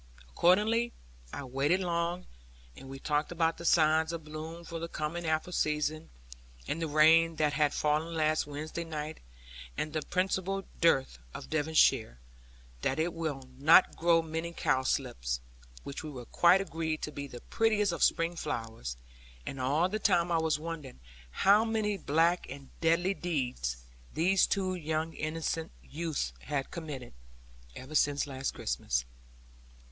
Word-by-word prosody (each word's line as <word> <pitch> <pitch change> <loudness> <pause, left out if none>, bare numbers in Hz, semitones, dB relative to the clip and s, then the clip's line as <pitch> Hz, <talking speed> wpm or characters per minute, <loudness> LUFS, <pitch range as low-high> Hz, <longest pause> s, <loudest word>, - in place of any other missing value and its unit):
Accordingly, 215 - +3 0.4
I - - -5
waited 140 +7 +1
long, 175 0 -1 0.5
and 135 - -11
we 135 - -7
talked 150 +3 -1
about 165 -1 0
the 170 - -7
signs 160 -1 +4
of 165 -1 -5
bloom 155 +2 -7
for 165 0 -6
the 165 - -4
coming 165 +2 -4
apple 160 +3 -1
season, 150 - -1 0.6
and 165 - -2
the 165 - 0
rain 160 +2 +5
that 150 -2 +1
had 150 -1 +2
fallen 155 +2 0
last 155 -1 +1
Wednesday 155 +3 -5
night, 155 -1 -5 0.6
and 155 - -2
the 155 - -1
principal 190 +3 -1 0.2
dearth 135 - +3 0.2
of - - -8
Devonshire, 155 - +3 0.6
that 135 - 0
it 165 +2 0
will 150 -5 -4
not 160 +6 +6
grow 165 0 +3
many 160 +1 -4
cowslips - - 0 0.4
which 140 - -6
we 135 -6 -7
quite 175 +3 +5
agreed 160 -4 -3
to 150 - -3
be 140 -1 -6
the 125 -3 -10
prettiest 215 -3 +1
of 170 - -4
spring 165 +1 +2
flowers; 110 - -4 0.5
and 135 - -5
all 145 +7 +2
the 215 +3 -3
time 175 -4 +2
I 165 - +3
was 160 -1 +1
wondering 155 - -7 0.3
how 200 - +4
many 220 -2 0
black 165 +2 +1
and 135 0 -10
deadly 170 +3 +3
deeds 125 - -2 0.3
these 185 +4 +3
two 185 -2 0
innocent 160 0 -3
youths 150 - -3
had 140 -1 -3
committed, 150 -8 -7 0.6
even 130 +4 -9
since 145 -1 +2
last 135 -1 -4
Christmas. - - -1
160 Hz, 145 wpm, -31 LUFS, 145-170 Hz, 0.6 s, not